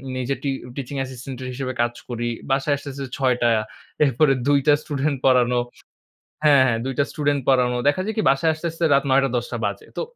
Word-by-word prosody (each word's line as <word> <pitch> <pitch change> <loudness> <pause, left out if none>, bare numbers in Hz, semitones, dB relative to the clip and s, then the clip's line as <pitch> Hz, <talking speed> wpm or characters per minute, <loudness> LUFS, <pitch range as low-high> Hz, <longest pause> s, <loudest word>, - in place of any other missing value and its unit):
নিজে 130 +2 -2
টি 140 - 0 0.3
teaching 140 0 -6
assistant 130 0 -6
এর - - -5
হিসেবে 130 0 -4
কাজ 120 0 0 0.2
করি। 120 -1 -3 0.2
বাসায় 135 +2 +2
আসতে, 140 - -8
আসতে 135 0 -6
৬ 130 -2 +2
টা। 120 - +4 0.6
এরপরে 135 +1 +3
২ 145 0 +4
টা 150 - +7
স্ডেটুন্ট 145 -1 -2
পড়ানো 125 -2 +4 0.9
হ্যাঁ, 145 -3 +6
হ্যাঁ, 115 -3 +1
২ 135 - -2
টা 140 - +4
স্টুডেন্ট 145 -1 0
পড়ানো। 125 -2 +3
দেখা 145 - +1
যায় 220 +2 -3
কি? 215 - +1
বাসায় 140 +4 +2
আসতে, 155 +2 -6
আসতে 165 +1 -3
রাত 140 - +3
৯ 135 +1 +5
টা, - - +1
১০ 120 0 -2
টা - - -1
বাজে। - - -5
তো - - 0
135 Hz, 220 wpm, -22 LUFS, 125-145 Hz, 0.9 s, টা